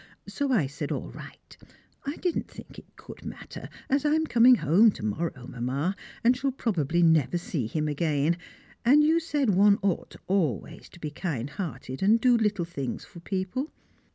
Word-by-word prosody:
So 285 -2 -2
I 205 - +3
said 140 +1 -5
"all - - -4
right;" - - -12 0.5
I 285 - -2
did 355 -1 -1
not - - -2
think - - -12
it - - -21
could - - -12
matter, - - -8 0.2
as 275 +1 +1
I 300 0 +3
am 315 0 +1
coming 245 -2 +6
home 185 - +5
to - - -6
morrow, 125 +3 -3
Mamma, 135 +10 -2 0.3
and 245 +2 +5
shall 270 +2 -1
probably 175 - 0
never 160 -2 +4
see 155 -8 -3
him 155 +5 -2
again, 150 +1 +1 0.5
and 285 +5 +6
you 320 +2 +4
said 295 -7 0
one 200 +2 +5
ought 195 -4 -1
always 170 - -1
to - - -14
be 150 -2 -5
kind 145 -6 -4
hearted 135 - -6
and 215 +4 +4
do 245 +1 +4
little 210 -6 +1
things 140 -6 -5
for 175 - -13
people. 190 - -3
180 Hz, 180 wpm, -27 LUFS, 150-245 Hz, 0.5 s, coming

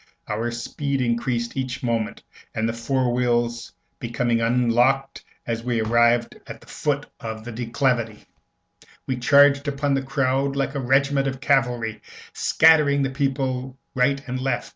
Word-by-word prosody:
Our 110 +3 -2
speed 135 +4 -3
increased 120 -1 -1
every 130 -1 -2
moment, 115 -3 -2 0.3
and, 110 0 0
the 115 - -2
fore 125 +1 0
wheels 120 -1 0 0.3
becoming 120 0 -1
unlocked 125 +3 +1 0.2
as 115 -1 -3
we 120 -1 -1
arrived 120 +1 +2
at - - -8
the - - -18
foot - - -2
of 110 -1 -7
the 120 - -6
declivity, 115 -1 -1 0.8
we 130 - -2
charged 140 +2 +5
upon 145 0 0
the 135 - +1
crowd 135 0 0
like 135 0 -1
a 140 - -2
regiment 135 +2 +2
of 130 -1 -4
cavalry, 125 -5 0 0.3
scattering 150 -3 +4
the 135 - -1
people 130 -2 -2 0.2
right 135 +2 +2
and 130 0 -3
left. 130 -1 -2
125 Hz, 145 wpm, -23 LUFS, 120-135 Hz, 0.8 s, charged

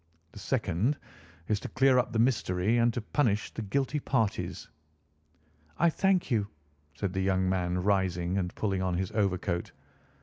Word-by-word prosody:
The 105 - -11
second 110 - 0 0.5
is 105 -2 +1
to - - -7
clear 135 -1 +4
up 125 - -1
the 115 - -1
mystery 110 -4 +2
and 120 0 +4
to 120 - -1
punish 110 -3 0
the - - -4
guilty 135 +7 -1
parties." 115 -7 -1 1.1
"I 170 0 +4
thank 190 -3 +1
you," 105 -4 +1 0.5
said 95 +3 -3
the 95 - -1
young 95 -1 +1
man, 90 -1 0
rising 95 -3 +1
and 90 -2 -3
pulling 95 -3 -1
on 90 -2 0
his 95 0 -2
overcoat. 95 -4 -1
100 Hz, 160 wpm, -29 LUFS, 95-120 Hz, 1.1 s, clear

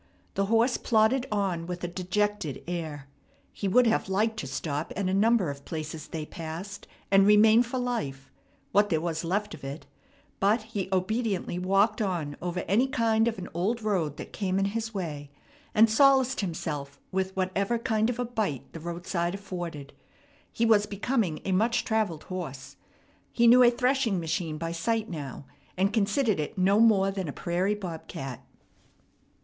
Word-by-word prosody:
The 195 0 0
horse 230 +3 +3
plodded 240 +3 +2
on 190 -5 -1
with 180 0 -5
a - - 0
dejected 185 -3 -2
air. 160 -5 -4 0.5
He 200 - -3
would 250 +6 +5
have 225 -3 +1
liked 215 +3 +1
to 140 - -4
stop 145 +3 -3
at 195 -1 -1
a 185 - 0
number 205 -4 +3
of 140 0 -10
places 155 -1 -6
they 155 -2 -5
passed, 170 +6 -7 0.2
and 195 0 +6
remain 215 +2 +7
for 245 +2 -3
life, 145 - -3 0.4
what 205 +2 +4
there 160 -4 +2
was 165 0 -2
left 205 +5 -1
of - - -11
it; 140 +2 -6 0.5
but 210 +3 +2
he 205 -4 -4
obediently 190 -1 -1
walked 195 +4 +2
on 170 -8 -2
over 180 0 -2
any 225 +9 +2
kind 230 -3 +2
of 225 - -1
an 185 -1 -6
old 210 +7 -1
road 175 -9 0
that - - -8
came 190 -2 -1
in 195 - +2
his 225 0 -2
way, 155 -8 -5 0.5
and 220 +1 +7
solaced 265 +2 +4
himself 150 -6 -4
with 190 0 -1
whatever 195 +4 0
kind 225 -1 +1
of 245 - -2
a 245 - -1
bite 215 - -3
the 165 - -7
roadside 175 +1 -3
afforded. 175 -7 -6 0.6
He 230 - 0
was 210 -2 +4
becoming 205 -5 -1
a 195 - -1
much 225 +5 +2
travelled 215 -8 0
horse. 155 -8 -6 0.6
He 235 - +2
knew 245 +2 +8
a 245 - +8
threshing 250 -4 +1
machine 165 -1 -2
by 165 +1 -3
sight 220 +6 -1
now, 145 -4 -6 0.3
and 195 +2 +2
considered 215 - +1
it 150 - -4
no 195 +3 +4
more 200 -4 +5
than 190 -3 -4
a - - -3
prairie 185 +4 0
bob 180 -6 -7
cat. 135 -3 -6
195 Hz, 175 wpm, -28 LUFS, 170-220 Hz, 0.6 s, knew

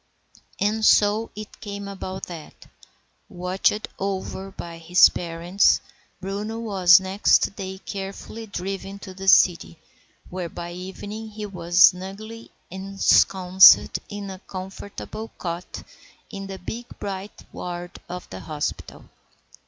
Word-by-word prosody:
And 215 +2 0
so 210 +1 +4
it 215 0 -10
came 200 -1 -6
about 190 -1 -6
that, 165 -3 -11 0.6
watched 185 +4 0
over 195 0 -3
by 170 -3 -9
his 175 +2 +6
parents, 175 +3 +1 0.4
Bruno 200 +4 -4
was 190 -6 +5
next 190 +1 +2
day 190 -1 -6
carefully 200 +3 -7
driven 195 0 -5
to 195 -1 -10
the 195 +1 -8
city, 175 -3 +5 0.5
where 180 -1 -5
by 170 +1 -7
evening 195 +5 -7
he 210 0 -7
was 175 -3 -2
snugly 195 +6 +3 0.2
ensconced 190 -1 +5
in 205 -1 -6
a 190 - -9
comfortable 195 +4 -8
cot 170 0 -5 0.5
in 195 0 -6
the 195 0 -6
big 235 +6 -7
bright 195 0 -6
ward 175 0 -6
of 180 0 -7
the 95 - -7
hospital. 150 +8 -5
190 Hz, 120 wpm, -24 LUFS, 180-205 Hz, 0.6 s, his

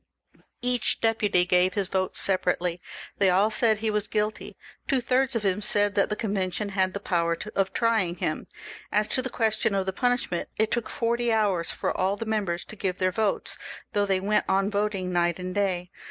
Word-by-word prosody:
Each 245 -4 0
deputy 210 -5 +2
gave 180 +1 +2
his 200 -2 +1
vote 185 0 -1
separately; 180 -2 0 0.4
they 195 - +4
aU 195 +4 +4
said 220 0 +3
he 220 0 -1
was 210 0 -1
guilty. 215 0 -2 0.3
Two 270 - +2
thirds 255 +1 +1
of 225 - -1
them 195 +1 +1
said 205 0 +3
that 200 - +2
the 210 - -1
Con 215 -2 -3
vention 195 +1 -2
had 190 -1 0
the - - -2
power 170 -3 0 0.2
of 195 -1 +1
trying 220 -6 +1
him. - - -3 0.4
As 210 0 +2
to 260 - +2
the 260 - -3
question 220 -3 +1
of 195 -1 0
the 190 - -2
punishment, 245 -6 -1
it 220 0 +1
took 235 -2 -1
forty 235 0 0
hours 200 -6 +1
for - - -2
all 190 +2 +1
the 225 - -5
members 200 -6 -1
to - - -10
give 190 -3 -2
their 185 0 +1
votes, 215 0 -1 0.3
though 205 -1 +1
they 190 -1 +2
went 205 +3 +1
on 195 +2 +2
voting 200 -3 -1
night 175 -1 +1
and 185 0 -5
day. 185 -3 -1
200 Hz, 200 wpm, -26 LUFS, 185-220 Hz, 0.4 s, they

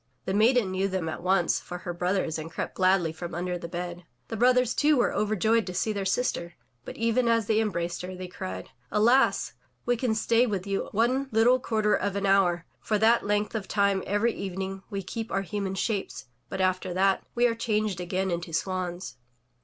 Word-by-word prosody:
The 190 - -1
maiden 220 -1 +3
knew 190 +1 0
them 185 -4 -2
at 160 - -5
once 180 -1 +2
for 180 - -7
her 175 0 -5
brothers 180 -2 -1
and 155 +1 -6
crept - - -4
gladly 185 -3 +2
from 170 +1 -6
under 180 +1 -2
the 170 - -6
bed. 175 0 -5 0.3
The - - -3
brothers, 250 +1 +3
too, 300 0 +3
were 240 - +2
overjoyed 215 +1 +1
to 180 - -5
see 215 - 0
their 200 -1 -3
sister, 185 -5 -1 0.3
but - - -8
even 230 +2 +1
as 230 -2 +3
they 220 +1 +2
embraced 175 -5 -2
her, 185 +1 -6
they 185 0 -6
cried: 95 - -7 0.2
'*Alas! 240 +6 +3 0.3
we 245 - +2
can 250 +2 -2
only 220 - +1
stay 230 +2 +3
with 200 -4 -2
you 195 -1 -2
one 250 +6 +1
httle 245 +1 +3
quarter 215 -4 +1
of 200 -1 0
an 200 0 -1
hour. 180 -3 +3
For 215 - 0
that 225 +1 +3
length 210 0 0
of 215 -4 -3
time 200 -2 +2
every 210 +3 +1
evening 190 0 -5
we 200 -2 -4
keep 225 +4 -5
our 195 - 0
human 195 -1 -3
shapes, 200 - -2 0.2
but 190 - -5
after 185 -1 0
that 195 +1 +2
we 240 0 +3
are 235 - +3
changed 215 -5 -1
again 185 +1 -1
into 170 -1 -4
swans.'' 180 -5 -3
195 Hz, 205 wpm, -27 LUFS, 180-225 Hz, 0.3 s, maiden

